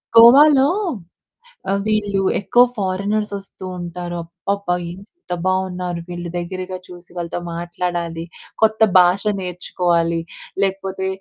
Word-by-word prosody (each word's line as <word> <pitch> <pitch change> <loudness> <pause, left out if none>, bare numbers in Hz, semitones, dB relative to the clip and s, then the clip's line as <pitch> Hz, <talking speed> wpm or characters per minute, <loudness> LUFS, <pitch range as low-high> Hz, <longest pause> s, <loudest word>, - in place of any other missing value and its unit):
గోవాలో 270 +4 +8 1.2
వీళ్ళు 205 -2 +1 0.2
ఎక్కువ 240 +4 +5
ఫారెనర్స్ 200 +2 -1
వస్తూ 195 -1 -11
ఉంటారు. 175 0 -5 0.3
అబ్బబ్బా! 200 -3 0 0.2
ఎంత 195 - -9
బావున్నారు? 180 -2 -1
వీళ్ళు 175 -1 -5
దగ్గరగా 185 +1 -4
చూసి 175 -1 -13
వాళ్ళతో 170 0 -3 0.2
మాట్లాడాలి. 170 -1 -3 0.4
కొత్త 220 0 +3 0.2
భాష 180 +3 +4 0.2
నేర్చుకోవాలి 175 -2 0 0.4
లేకపోతే 190 0 -2
185 Hz, 95 wpm, -20 LUFS, 175-200 Hz, 1.2 s, గోవాలో